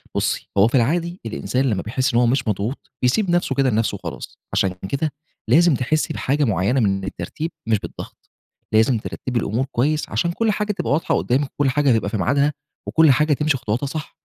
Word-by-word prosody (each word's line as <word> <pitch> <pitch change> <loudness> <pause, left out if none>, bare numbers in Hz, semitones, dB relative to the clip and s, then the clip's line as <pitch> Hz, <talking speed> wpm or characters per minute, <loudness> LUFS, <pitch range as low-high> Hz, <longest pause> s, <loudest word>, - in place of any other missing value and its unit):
بُصي، - - -1
هو 100 +2 +6
في 120 - -1
العادي 170 +8 +1
الإنسان 125 +4 -1
لمّا 100 -5 0
بيحس 130 +6 -1
إن 120 - +4
هو 120 - +4
مش 125 +1 +1
مضغوط 105 +5 -3
بيسيب 175 - +2
نفْسه 175 -6 +1
كده 135 0 +3
لنفْسه 110 -2 0
وخلاص، 85 -8 -8 0.2
عشان 95 -1 +1 0.2
كده 145 +2 -1 0.4
لازم 170 0 +5
تحسي 155 +6 0
بحاجة 145 +3 0
معينة 105 +2 +1
من 95 -4 +1
الترتيب 125 - -5 0.2
مش 110 -2 +2
بالضغط، - - -10 0.4
لازم 110 +3 +4
ترتبي 120 +3 -3
الأمور 115 +4 -1
كويس 150 +6 0
عشان 170 -1 0
كل 220 +5 +1
حاجة 210 +1 -1
تبقى 205 - -3
واضحة 155 - +1
قدامِك 135 +2 0
وكل 145 -2 +1
حاجة 140 0 +2
تبقى - - -2
في 110 - -2
ميعادها 140 +8 +2 0.3
وكل 160 -2 +5
حاجة 150 +3 +3
تمشي 150 0 +1
خطواتها 120 +2 -2
صح. 155 +3 -6
130 Hz, 195 wpm, -21 LUFS, 110-150 Hz, 0.4 s, هو